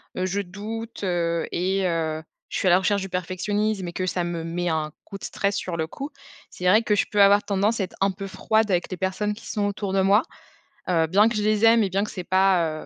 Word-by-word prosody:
je 185 +2 -1
doute 215 +4 -7
et 175 +2 0
heu, 160 -2 -1 0.3
je - - -3
suis 190 - 0
à - - +6
la 180 - +6
recherche 200 +1 +1
du 195 - -4
perfectionnisme 190 +2 -1
et 170 - -6
que 185 - -2
ça 180 -1 -1
me 170 -1 -3
met 175 +1 -3
un 155 -2 -1
coup 195 - -8
de - - -17
stress 200 0 -1
sur 175 -4 -3
le 160 0 -1
coup, 280 - -7 0.4
c'est 180 - -8
vrai 215 +5 +5
que 210 - +2
je - - +2
peux 205 -1 +3
avoir 200 +1 +6
tendance 205 +3 +1
à - - +1
être - - -16
un 195 0 +3
peu 195 +1 -7
froide 220 +2 +1
avec 175 +1 0
les 185 - -4
personnes 195 +3 -1
qui 220 +2 -12
sont 205 -1 0
autour 200 -1 -3
de 195 - +3
moi, 200 +5 +4 0.7
heu, 165 -2 +3
bien 205 +6 +4
que 230 - -3
je 210 - 0
les 215 +1 +3
aime 230 0 +6
et 195 - 0
bien 195 +2 +1
que 210 - -3
c'est 180 -3 -6
pas 180 -5 +2
195 Hz, 250 wpm, -24 LUFS, 175-210 Hz, 0.7 s, à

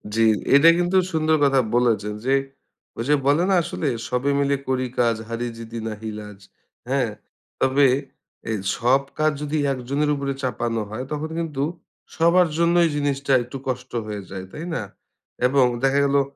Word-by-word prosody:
জি। 115 0 +4 0.3
এটা 150 +4 +8
কিন্তু 175 +2 +2
সুন্দর 160 -1 +2
কথা 135 -1 +4 0.2
বলেছেন 110 -4 +1
যে, 135 +1 +3 0.6
ওই 115 - -2
যে 150 - +5
বলে 145 +5 +4
না 195 - +4
আসলে, 160 - -3 0.2
"সবে 125 +3 0
মিলে 140 0 +2
করি 130 -1 0
কাজ, 115 -1 +3
হারি 115 +1 -3
জিতি 115 0 -7
নাহি 110 0 -5
লাজ।" 105 -2 -10 0.5
হ্যাঁ? 130 -4 +1 0.5
তবে 135 +1 +4 0.6
এই 110 - 0 0.2
সব 130 +3 +3 0.2
কাজ 155 0 +3
যদি 150 +1 -2
১ 130 - -3
জনের 150 +2 +1
উপরে 140 -1 -2
চাপানো 120 -3 -1
হয়, 110 +4 -5
তখন 150 +1 -3
কিন্তু 150 -5 -2 0.5
সবার 170 +2 +4
জন্যই 170 0 +4
জিনিসটা 140 -1 0
একটু 125 +3 -8
কষ্ট 130 0 -4 0.2
হয়ে 105 -1 -4
যায়, 95 -1 -6
তাই 160 - -7
না? - - -2 0.6
এবং 135 0 +4 0.2
দেখা 135 +1 +3
গেলো 140 0 +3
135 Hz, 165 wpm, -23 LUFS, 120-150 Hz, 0.6 s, এটা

